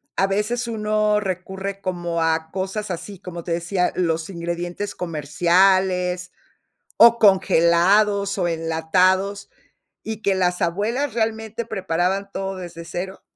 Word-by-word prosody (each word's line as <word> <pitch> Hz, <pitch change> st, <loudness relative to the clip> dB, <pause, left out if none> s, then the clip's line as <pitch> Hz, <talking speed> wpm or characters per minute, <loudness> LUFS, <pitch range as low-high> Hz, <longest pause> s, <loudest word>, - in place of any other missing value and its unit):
a 195 Hz, -, +3 dB
veces, 215 Hz, +5 st, -1 dB
uno 215 Hz, -1 st, +1 dB
recurre 190 Hz, 0 st, -5 dB
como 175 Hz, -3 st, -2 dB
a 160 Hz, 0 st, 0 dB
cosas 195 Hz, +3 st, -3 dB
así? 180 Hz, +2 st, -6 dB
Como 175 Hz, -3 st, -8 dB
te 170 Hz, -, -5 dB
decía, 180 Hz, +2 st, 0 dB
los 165 Hz, -2 st, -1 dB
ingredientes 175 Hz, +3 st, -4 dB
comerciales 180 Hz, +3 st, +1 dB, 0.7 s
o 235 Hz, 0 st, +7 dB
congelados, 200 Hz, +1 st, +3 dB
o 180 Hz, -, +1 dB
enlatados, 180 Hz, +5 st, +1 dB, 0.5 s
y 220 Hz, -1 st, -5 dB
que 195 Hz, -, +2 dB
las 180 Hz, 0 st, 0 dB
abuelas, 220 Hz, +10 st, -1 dB
realmente, 220 Hz, 0 st, -2 dB
preparaban 190 Hz, -1 st, -1 dB
todo 195 Hz, 0 st, -4 dB
desde 170 Hz, -2 st, -8 dB
cero. 190 Hz, +3 st, -6 dB
190 Hz, 120 wpm, -22 LUFS, 175-205 Hz, 0.7 s, o